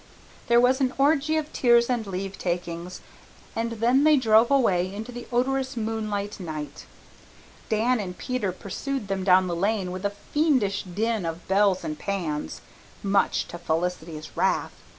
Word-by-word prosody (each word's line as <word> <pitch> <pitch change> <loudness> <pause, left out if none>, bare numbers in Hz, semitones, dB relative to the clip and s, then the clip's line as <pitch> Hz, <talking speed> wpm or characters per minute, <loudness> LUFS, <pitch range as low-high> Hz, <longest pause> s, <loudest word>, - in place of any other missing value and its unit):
There 235 0 +5
was 255 +3 +3
an 260 0 +1
orgy 295 +2 +3
of 310 -1 -3
tears 235 -1 +4
and 240 -4 -1
leavetakings, 180 -2 -4 0.5
and 230 +1 -1
then 240 +5 +3
they 305 -1 +6
drove 225 -2 +5
away 190 -10 +2
into 220 +5 -6
the 245 0 -8
odorous 265 +2 0
moonlight 215 -2 -3
night. 155 -4 -6 0.8
Dan 230 +3 +2
and 180 -3 -5
Peter 250 -7 -2
pursued 205 +5 -5
them 195 -1 -1
down 185 0 +5
the 175 -2 -2
lane 195 0 0
with 185 +1 -6
a 200 - +1 0.2
fiendish 260 -11 +2
din 215 +3 -2
of 165 +1 -5
bells 195 0 +3
and 155 0 -4
pans, 170 -7 -3 0.4
much 195 -1 +1
to 175 - -7
Felicity's 165 -2 -3
wrath. - - +1
205 Hz, 150 wpm, -25 LUFS, 180-245 Hz, 0.8 s, they